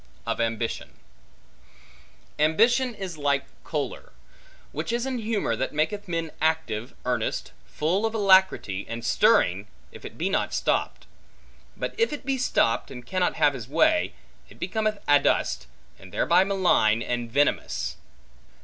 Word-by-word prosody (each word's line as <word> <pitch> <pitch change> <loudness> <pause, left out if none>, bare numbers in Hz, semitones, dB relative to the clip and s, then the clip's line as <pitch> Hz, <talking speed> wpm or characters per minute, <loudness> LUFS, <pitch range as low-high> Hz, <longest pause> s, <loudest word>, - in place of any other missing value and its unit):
Of - - -1
Ambition 115 0 -2 1.5
AMBITION 230 - +3
is 180 -6 -6
like 140 -2 +1 0.2
choler; - - -4 0.6
which 155 +8 -3
is 235 +1 -1
an 260 -2 -2
humor 215 - -1
that 130 +5 -3
maketh 200 +7 -1
men 165 -2 -2
active, 150 -8 -1
earnest, 125 -3 -1 0.2
full 185 +8 0
of 225 - -5
alacrity, 190 - +3
and 115 0 -5
stirring, 95 -2 +3 0.2
if - - -13
it - - -9
be 170 - -1
not 195 - 0
stopped. - - -1 0.7
But - - -3
if 460 - +3
it 295 -3 -6
be 270 -1 0
stopped, 115 - +1
and 125 -2 -9
cannot 185 +2 0
have 145 -2 +3
his 120 -5 -7
way, 310 - +2 0.3
it - - -16
becometh 215 -1 -1
adust, 140 - +2 0.3
and - - -14
thereby 190 - +3
malign 175 - +3
and 120 -1 -3
venomous. 60 - 0
160 Hz, 140 wpm, -26 LUFS, -, 1.5 s, AMBITION